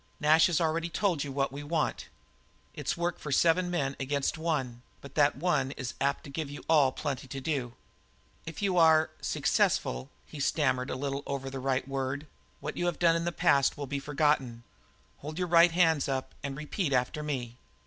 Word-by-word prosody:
Nash 155 +1 +5
has 170 -4 +1
already 165 0 0
told 175 -4 0
you 140 - -5
what 135 0 -1
we 140 +1 -6
want. 155 +1 -2 0.7
It's - - -3
work 170 0 -2
for 150 - -6
seven 175 +5 +3
men 140 -6 -1
against 140 +1 -1
one, 140 -7 -2 0.2
but 140 - -12
that 145 -1 +3
one 150 -3 +1
man 135 - -6
is 130 -3 -4
apt 140 0 0
to 140 - -10
give 150 0 -4
you 145 - -8
all 150 -5 +5
plenty 135 -1 -4
to 135 +1 -6
do. 130 -4 -3 0.7
If 165 +4 -6
you 185 -3 +2
are 160 -1 +5
successful" 65 +2 0 0.2
he 150 - -10
stammered 130 -3 +1
a - - -2
little 140 +1 -3
over 135 -1 -4
the 135 - -5
right 130 0 -1
word 135 +1 -3 0.4
"what 150 +2 -5
you 175 - 0
have 175 - -1
done 170 -1 +4
in 165 0 -1
the 175 - 0
past 155 -7 +3
will 145 - -4
be 140 +1 -3
forgotten. 140 -5 0 0.6
Hold 150 +2 -7
up - - -11
your 180 -1 -1
right 170 0 +6
hands 165 -5 +3
and 135 +1 -4
repeat 155 +1 -2
after 130 +4 0
me." 125 -5 -4
145 Hz, 200 wpm, -29 LUFS, 135-165 Hz, 0.7 s, right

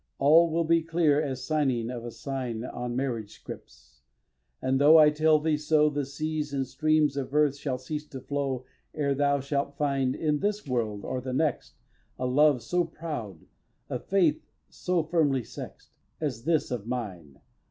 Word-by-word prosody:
All 160 +4 +6
will 165 +1 +1
be 165 +1 +3
clear 160 -3 +2
as 130 -4 -4
signing 130 -6 0
of 120 -2 -6
a 120 - -5
sign 125 -2 -4
On 120 -1 -5
marriage 120 -5 -2
scrips; 65 0 -12 0.6
and, 135 +1 0
though 155 +3 +8
I 150 -1 +7
tell 155 +1 +4
thee 155 0 0
so, 150 0 +3
The 145 -1 -2
seas 150 +1 -3
and 135 -1 0
streams 150 +2 +1
of 140 0 -4
earth 150 -2 +3
shall 140 -2 -3
cease 150 +4 -6
to 135 - -8
flow 135 -1 -3 0.3
Ere 140 -2 +1
thou 140 0 +2
shalt 140 +1 -2
find, 135 -3 0
in 150 -2 0
this 210 +1 -1
world 115 -6 -2
or 130 -1 -3
the 130 0 -5
next, 155 +3 -1 0.4
A 125 - -2
love 135 -1 +3
so 175 +8 +1
proud, 150 - -7 0.5
a - - -1
faith 160 -6 +1 0.3
so 180 -2 -1
firmly 150 -6 +1
sex'd, - - -10 0.3
As 130 -6 -3
this 160 -5 +1
of 115 -3 -4
mine. 95 - -5
140 Hz, 175 wpm, -27 LUFS, 130-155 Hz, 0.6 s, though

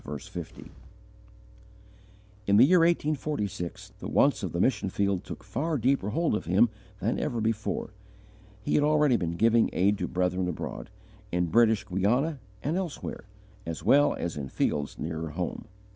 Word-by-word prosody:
In 100 0 +5
the 120 - +8
year 180 +5 +5
1846, 150 - -1
the - - -6
wants - - +3
of - - -3
the - - -3
mission - - +1
field 100 -2 0
took - - -8
far 155 +4 -2
deeper 125 -4 +1
hold 165 +9 0
of 105 - -2
him 100 +7 +4 0.3
than 105 +5 -1
ever 120 -6 -2
before. 110 -1 -2 0.7
He - - -1
had 145 - +4
already 150 -3 +4
been 85 -6 -1
giving 115 +4 +4
aid 100 +2 +2
to - - -1
brethren 90 0 0
abroad, 90 - -5 0.4
in 90 -1 0
British 110 -2 +4
Guiana 125 - 0 0.2
and 155 +6 0
elsewhere, 180 - -5 0.4
as 85 -1 -5
well 145 +1 +4
as 85 -3 -4
in 70 -2 -5
fields 70 +1 -1
nearer 80 0 -4
at 75 - -12
home. - - -3
110 Hz, 155 wpm, -28 LUFS, 90-145 Hz, 0.7 s, the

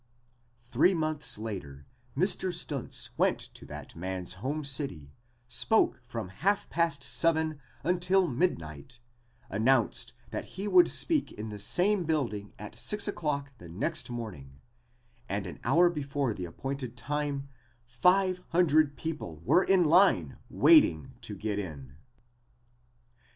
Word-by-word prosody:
Three 135 +10 +3
months 155 -5 -1
later 90 -11 -7 0.3
Mr. 185 +2 +2
Stuntz 150 -7 -3
went - - +3 0.2
to - - -13
that - - -9
man's 90 +1 -4
home 145 +4 -2
city, 130 - -3 0.3
spoke 130 - +2
from 115 -6 -5
half 195 - 0
past 165 -5 0
seven 160 -2 +2 0.2
until 180 +3 +2
midnight, 120 - -2 0.5
announced 115 +4 +2 0.2
that 110 - -4
he 200 +2 -2
would 355 - +6
speak 315 -4 +2
in 110 +1 -6
the 105 -1 -7
same 180 - +2
building 120 -10 -1
at 105 +1 -8
six 210 - 0
o'clock 145 -7 -2
the 85 - -11
next 90 +8 -1
morning, 90 - -7 0.7
and 100 0 -2
an 90 - -8
hour 165 +9 +5
before 140 -6 -1
the 90 -3 -5
appointed 130 +6 -6
time 145 +1 -3 0.4
five 180 +9 +2
hundred 155 -4 +3
people 150 - -5
were 180 - +5
in 190 -2 +4
line 160 - +4
waiting 80 +12 +5
to 110 -3 -6
get 105 +1 -3
in. 70 -8 -7
135 Hz, 130 wpm, -29 LUFS, 105-170 Hz, 0.7 s, would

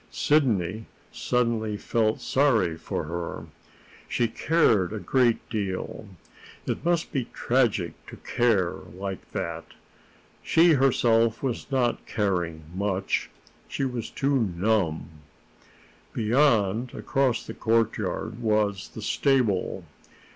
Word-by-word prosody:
Sidney 110 - +1 0.2
suddenly 115 -3 0
felt 110 0 0
sorry 115 - +2
for - - -4
her. 85 +2 -5 0.6
She 120 - +1
cared 115 - +2
a - - -3
great 120 +5 +1
deal. 100 -1 -4 0.6
It - - -3
must 170 -1 0
be 135 -6 -1
tragic 115 -10 0
to - - -10
care 110 -8 +1 0.2
like 95 -1 -6
that! - - -3 0.8
She 165 0 +5
herself 115 -4 +3
was 130 -1 -3
not 130 -3 0
caring 90 -7 -1
much; 95 0 -1 0.4
she 135 - -2
was 125 -3 -4
too 140 0 +1 0.2
numb. 95 -6 +1 1.1
Beyond, 115 -2 +2
across 135 -4 0
the - - -7
courtyard, 115 -1 -1
was 105 -3 +1
the 110 - -6
stable. 125 -8 +1
115 Hz, 105 wpm, -26 LUFS, 100-125 Hz, 1.1 s, She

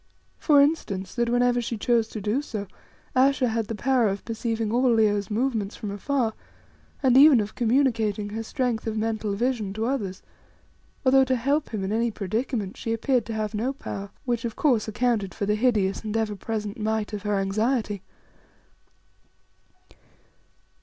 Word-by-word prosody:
For 295 -3 +5
instance, 200 - -1
that 235 -1 0
whenever 245 0 +2
she 230 0 -3
chose 230 +1 +2
to 220 - -6
do 210 +7 0
so, 215 -8 -5 0.5
Ayesha 265 -1 +3
had 225 -1 -1
the 225 - -4
power 255 +1 +2
of 195 0 -3
perceiving 225 -1 -2
all 250 +1 +3
Leo's 210 -3 +2
movements 220 -2 -1
from 210 - -5
afar, 225 +3 -1 0.7
and 255 -2 +4
even 280 -2 +8
of 210 0 -3
communicating 225 -4 +1
her 220 +2 -4
strength 235 -1 -2
of 220 0 -2
mental 215 -2 -1
vision 230 -3 -1
to 220 +2 -2
others, 210 -8 -3 0.8
although 265 +1 +6
to 260 0 +1
help 280 +5 0
him 210 -4 -3
in 190 - -2
any 230 +2 +1
predicament 215 0 -3
she 225 - -2
appeared 240 +1 0
to 225 - -4
have 215 -1 -2
no 235 +6 -1
power, 200 -7 -6 0.2
which, 240 -2 -1
of 230 -2 -3
course, 245 -8 +2
accounted 215 -3 0
for 205 - -2
the 210 - +1
hideous 210 -4 +1
and 215 0 -2
ever 215 -2 -1
present 210 +2 -4
might 220 0 -1
of 205 - -3
her 205 0 0
anxiety. 210 +1 0
225 Hz, 165 wpm, -25 LUFS, 210-245 Hz, 0.8 s, even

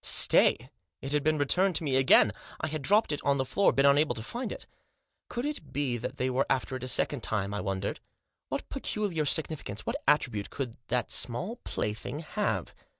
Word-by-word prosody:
Stay! 130 +4 +5 0.3
It 135 - -5
had 150 0 +2
been 155 0 +2
returned 180 +6 +2
to 160 - 0
me 140 -4 0
again. 130 -5 +6 0.3
I - - -2
had 155 0 -4
dropped 205 +8 +3
it 145 - -2
on 140 -1 +2
the 130 - 0
floor; 200 +9 +3
been 135 - +2
unable 145 +2 +4
to 110 - -5
find 240 - -4
it. - - -6 0.6
Could 240 +2 -3
it 285 - -5
be 135 -2 0
that 120 - -5
they 130 - 0
were 130 +2 0
after 130 0 0
it 130 - -6
a - - -3
second 130 +1 +1
time. 100 -3 -2
I 105 - -2
wondered. 95 -1 -3 0.5
What - - -3
peculiar 185 -8 -2
significance, 145 -9 -2
what - - -3
attribute, 120 -8 +1
could 125 -5 -5
that 120 -1 -1
small 180 - 0
plaything 110 - -4
have 205 +6 -2
140 Hz, 200 wpm, -29 LUFS, 120-160 Hz, 0.6 s, again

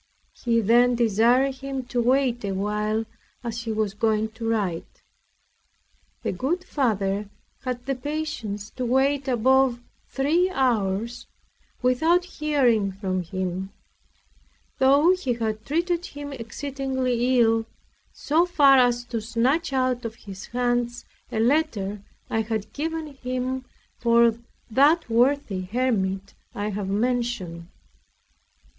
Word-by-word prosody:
He 230 -1 +1
then 240 +3 +4
desired 240 +4 +3
him 270 0 -4
to 245 0 -1
wait 250 -1 +2
awhile, 210 +3 -1 0.4
as 235 0 -4
he 225 - -2
was 215 -2 -1
going 220 0 +1
to 225 +1 -5
write. 195 -7 -2 1.2
The - - 0
good 295 - -1
Father 205 - -1 0.3
had 250 -1 -4
the 275 - 0
patience 255 -7 -4
to 255 - -5
wait 270 +3 +1
above 260 0 +3 0.3
three 320 +7 +1
hours, 235 - 0 0.6
without 320 +8 +3
hearing 260 - +1
from 190 -1 -2
him; 185 +2 -4 1.1
though 280 +6 +5
he 365 -9 0
had 220 -2 -3
treated 340 +3 0
him 285 0 -7
exceedingly 260 0 -1
ill, 225 -1 +3 0.4
so 325 +4 +1
far 280 -6 +6
as 245 -1 +3
to 235 -2 -3
snatch 245 +9 0
out 255 -2 0
of 225 -1 -5
his 195 -4 -10
hands 240 -1 -1 0.3
a 220 - -1
letter 220 -6 +1 0.3
I 225 - 0
had 220 -2 -4
given 320 +2 -3
him 255 0 -3 0.3
for 235 -1 +4 0.4
that 295 +8 +4
worthy 240 -4 +2
hermit 195 -2 -1 0.2
I 205 +1 -2
have 200 -1 -3
mentioned. 210 -6 -1
240 Hz, 120 wpm, -25 LUFS, 215-270 Hz, 1.2 s, far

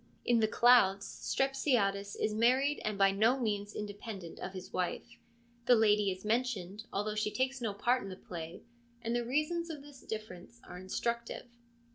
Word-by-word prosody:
In 240 -1 +4
the 220 - +3
Clouds, 215 -4 +5
Strepsiades 225 -8 0
is 215 - -1
married 255 +6 +3
and 215 -1 -2
by 195 0 +5
no 225 +7 +3
means 205 -3 -2
independent 205 -4 -6
of 190 - -5
his 185 0 -8
wife: 185 +6 -3 0.5
the 245 - +7
lady 210 -2 +4
is 185 +1 -5
mentioned, 215 -3 -1
although 210 +2 -1
she 215 0 0
takes 260 +3 -1
no 225 -3 -1
part 245 +5 +2
in 195 - -7
the 185 - -6
play, 170 -3 -8 0.4
and 230 +1 -1
the 240 - +1
reasons 305 +7 -1
of 300 -3 -7
this 285 -2 -14
difference 215 0 -8
are 180 - -9
instructive. 235 +7 -3
215 Hz, 170 wpm, -32 LUFS, 195-245 Hz, 0.5 s, the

